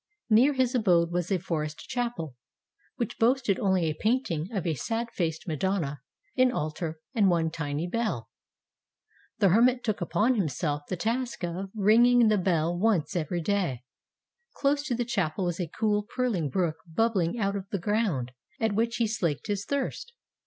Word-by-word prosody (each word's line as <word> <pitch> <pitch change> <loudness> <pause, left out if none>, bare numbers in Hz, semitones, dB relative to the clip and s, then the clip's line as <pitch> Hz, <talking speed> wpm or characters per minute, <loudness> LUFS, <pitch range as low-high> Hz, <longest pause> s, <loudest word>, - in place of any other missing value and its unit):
Near 250 +7 +6
his 260 -1 +1
abode 175 -8 +3
was 175 +1 -2
a 190 - +3
forest 155 -4 -4
chapel, 235 - -3 0.6
which 235 -5 -4
boasted 235 -4 +2
only 190 -4 +2
a 155 - 0
painting 195 - -1
of 195 -5 -2
a 165 - +1
sad 225 - -3
faced 160 -2 -2
Madonna, 160 -4 -1 0.3
an 255 -1 +4
altar, 155 -3 -3
and 205 -4 +4
one 165 -2 +1
tiny 150 -1 -3
bell. 210 - -2 1.1
The 200 - +4
hermit 245 +6 +4
took 215 -5 -1
upon 215 +8 +2
himself 150 - -1
the 185 - -1
task 235 +4 -2
of 180 +3 -3
ringing 230 +3 +5
the 210 -2 +3
bell 175 -2 +1
once 190 -4 +1
every 175 +1 -1
day. 170 - -1 0.7
Close 285 0 +1
to 245 - 0
the 240 0 -1
chapel 190 -6 -1
was 175 0 -2
a 175 - -1
cool, 210 +5 0
purling 210 - -1
brook 160 +1 0
bub 225 +7 +2
bling 175 +1 0
out 200 -2 0
of 195 -1 -5
the 200 - -1
ground, 185 - 0 0.3
at 220 -2 +1
which 230 +3 0
he 235 - +1
slaked 175 - -1
his 205 -1 -2
thirst. 285 - -3
195 Hz, 170 wpm, -28 LUFS, 165-230 Hz, 1.1 s, Near